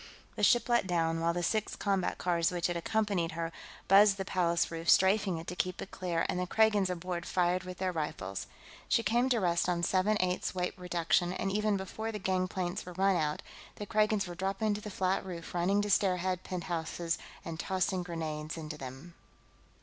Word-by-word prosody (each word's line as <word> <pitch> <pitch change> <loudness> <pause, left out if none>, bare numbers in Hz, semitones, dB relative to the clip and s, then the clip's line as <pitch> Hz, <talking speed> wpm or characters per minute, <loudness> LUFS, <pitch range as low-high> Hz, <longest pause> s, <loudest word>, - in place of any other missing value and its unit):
The - - -4
ship 240 - +4
let 240 -5 +2
down, 165 -2 +1
while 165 +1 +2
the 175 +1 -2
six 215 +4 0
combat 195 -3 0
cars 170 -2 +1
which 175 -1 -2
had 175 - 0
accompanied 195 -2 0
her 165 0 -3 0.4
buzzed 200 +1 +6
the 195 - -3
Palace 170 -3 +1
roof, 165 0 -3
strafing 190 -1 +4
it 160 - -7
to 180 - -5
keep 185 0 -2
it - - -7
clear, 170 -3 -1
and 180 - -1
the 180 - -1
Kragans 210 -2 +3
aboard 180 0 -3
fired 180 0 +1
with 185 -1 -7
their 185 0 -1
rifles. 100 - -4 0.4
She 230 - +3
came 240 +5 +2
to 240 -3 +3
rest 175 -2 +1
on 175 -1 0
seven 190 +4 +2
eighths 185 +1 -1
weight 180 -1 -1
reduction, 175 -1 +1
and 195 +1 -2
even 210 0 +1
before 220 +4 -4
the 210 - -5
gangplanks 185 0 -1
were 180 - -9
run 190 +2 +3
out, 150 -3 -1 0.3
the 205 - -6
Kragans 215 -1 +2
were 175 - -6
dropping 195 +4 -1
to 205 - -4
the 210 - -6
flat 190 -1 0
roof, 175 -3 -7
running 190 +4 +2
to 205 - -2
stairhead 185 -2 +2
penthouses 170 -2 -3 0.3
and 165 -1 -5
tossing 185 0 0
grenades 160 -3 -4
into 155 -1 -6
them. 135 +6 -9
180 Hz, 195 wpm, -31 LUFS, 170-195 Hz, 0.4 s, buzzed